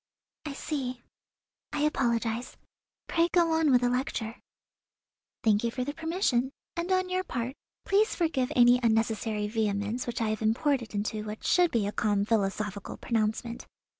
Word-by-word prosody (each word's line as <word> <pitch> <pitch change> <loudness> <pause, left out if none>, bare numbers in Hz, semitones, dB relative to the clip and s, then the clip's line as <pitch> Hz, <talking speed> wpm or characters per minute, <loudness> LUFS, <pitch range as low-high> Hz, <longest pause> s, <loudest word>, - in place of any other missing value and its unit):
"I 290 - -4
see; 255 -4 -4 0.7
I 300 - -2
apologize. 240 -5 0 0.5
Pray 335 0 +2
go 340 -2 +3
on 320 -1 +3
with 250 -2 +5
the 245 - +2
lecture." 245 -2 -2 1.0
"Thank 215 -2 +3
you 235 - +1
for 250 +2 -3
the 290 +3 -3
permission, 320 -6 0 0.2
and 345 +2 -2
on 370 0 +2
your 370 0 0
part 250 -6 -3 0.3
please 415 +3 +3
forgive 310 -7 0
any 245 0 +6
unnecessary 220 -2 +1
vehemence 210 +2 -1
which 240 - -3
I 225 -2 0
have 215 0 -2
imported 235 +1 +1
into 210 +1 -2
what 215 0 -7
should 355 -1 +4
be 230 -7 +1
a 205 - -1
calm 205 -2 +1
philosophical 205 -2 -1
pronouncement. 230 +1 -2
240 Hz, 155 wpm, -29 LUFS, 220-290 Hz, 1.0 s, any